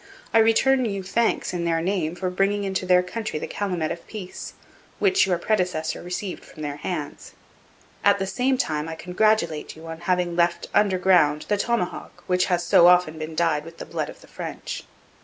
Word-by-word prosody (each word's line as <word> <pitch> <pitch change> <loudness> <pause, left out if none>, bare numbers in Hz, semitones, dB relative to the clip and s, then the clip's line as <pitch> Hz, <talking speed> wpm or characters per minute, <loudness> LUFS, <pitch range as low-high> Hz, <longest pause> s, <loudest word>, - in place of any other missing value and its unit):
I 225 - +6
return 255 +4 +4
you 200 -3 -3
thanks 225 +3 0
in 175 -1 -2
their 165 -1 +1
name 175 -2 -1
for 185 0 -2
bringing 195 +2 +1
into 190 -1 -2
their 180 0 +5
country 215 0 -4
the - - -4
calumet 180 -6 -2
of 170 0 -7
peace, 195 -4 -7 0.4
which 390 - +3
your 180 -2 +2
predecessor 175 -5 -1
received 180 +2 -5
from 155 - -11
their 145 -1 -4
hands. 150 -1 -5 0.7
At 200 0 +5
the 195 - -2
same 255 +6 0
time 155 -6 -1
I 160 - -5
congratulate 180 -3 0
you 160 +1 -12
on 165 0 -7
having 175 0 0
left 170 0 +1
under 200 -3 +3
ground 175 -5 +3
the 205 - +2
tomahawk 230 -4 -2
which 180 0 +2
has 175 -1 0
so 170 - +6
often 180 -3 +4
been 155 +1 -5
dyed 160 -3 +1
with 165 +1 -12
the - - -7
blood - - -3
of - - -12
the - - -16
French. - - -6
180 Hz, 195 wpm, -24 LUFS, 165-200 Hz, 0.7 s, I